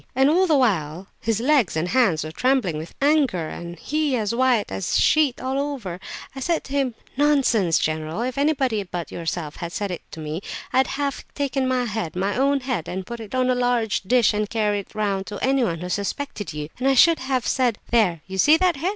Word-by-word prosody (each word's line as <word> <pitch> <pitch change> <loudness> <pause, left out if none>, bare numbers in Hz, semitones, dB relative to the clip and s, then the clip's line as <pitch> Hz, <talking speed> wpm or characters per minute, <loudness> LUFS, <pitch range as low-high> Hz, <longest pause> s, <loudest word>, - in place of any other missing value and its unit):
And 270 +3 +4
all 370 +3 +3
the 310 -4 +4
while 185 - 0
his 225 -1 0
legs 255 - +2
and 170 +3 -1
hands 200 -10 +2
were 155 - -6
trembling 230 - +1
with 160 +2 -9
anger, 270 - +2
and 175 0 -7
he 300 - -1
as 215 -1 -1
white 250 -3 +2
as 95 0 -1
a - - +3
sheet 300 -5 +3
all 265 +1 -2
over! 255 -12 -4
So - - -9
I - - -3
said 335 +4 0
to 270 - -9
him, 270 -4 0 0.2
'Nonsense, 265 - +3
general; 155 +6 -2
if 255 0 -3
anybody 275 -6 +1
but 180 -3 -6
yourself 165 -2 -4
had 170 -1 -5
said 200 +1 -3
that 175 - -5
to - - -7
me, 155 +3 -4 0.3
I'd 260 +1 +4
have 280 0 -3
taken 270 -2 -1
my 255 -1 +1
head, 210 -8 -3
my 195 +3 -1
own 275 +1 +2
head, 250 - -3
and 185 0 -4
put 235 +3 -7
it 220 +2 -7
on 255 0 +2
a - - +3
large 245 -3 +1
dish 235 +3 +3
and 210 0 -1
carried 210 -3 0
it - - -23
round 200 -3 -1
to 205 - -5
anyone 245 -11 +1
who 180 - -5
suspected 205 +3 -3
you; 150 -1 -5
and 260 - 0
I 270 - +4
should 330 +5 +6
have 260 -2 -1
said: 245 -4 +1
"There, 195 -9 +3
you 190 0 -6
see 300 +10 +6
that 360 -3 +2
head? 335 +7 -1
235 Hz, 225 wpm, -23 LUFS, 180-270 Hz, 0.3 s, should